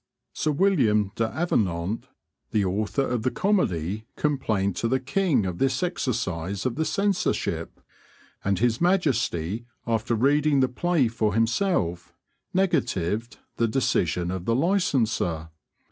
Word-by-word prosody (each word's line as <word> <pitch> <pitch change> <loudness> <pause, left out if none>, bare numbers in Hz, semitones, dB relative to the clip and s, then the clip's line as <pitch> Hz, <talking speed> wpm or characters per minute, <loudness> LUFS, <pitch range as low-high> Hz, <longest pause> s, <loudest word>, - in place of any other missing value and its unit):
Sir 155 - -1
William 130 - +2
D'Avenant, 110 - -1 0.4
the 105 -2 +1
author 105 +8 0
of 125 -3 -1
the 130 - +1
comedy, 110 - 0
complained 110 - 0
to 115 - 0
the 130 +3 +1
king 140 - +1
of 90 -1 -4
this 135 +3 +1
exercise 100 - -2
of 130 - +1
the 160 +5 -1
censorship, 200 +2 -1 0.6
and 100 -1 +1
His 115 - +1
Majesty, 120 - +1 0.2
after 115 0 0
reading 145 +4 +3
the 130 -1 +3
play 160 0 +1
for 110 -2 -1
himself, 110 - 0 0.4
negatived 115 - 0 0.2
the 115 - +2
decision 90 - 0
of 95 -1 -4
the 115 - +2
licenser. 115 - +1
115 Hz, 125 wpm, -25 LUFS, 100-145 Hz, 0.6 s, reading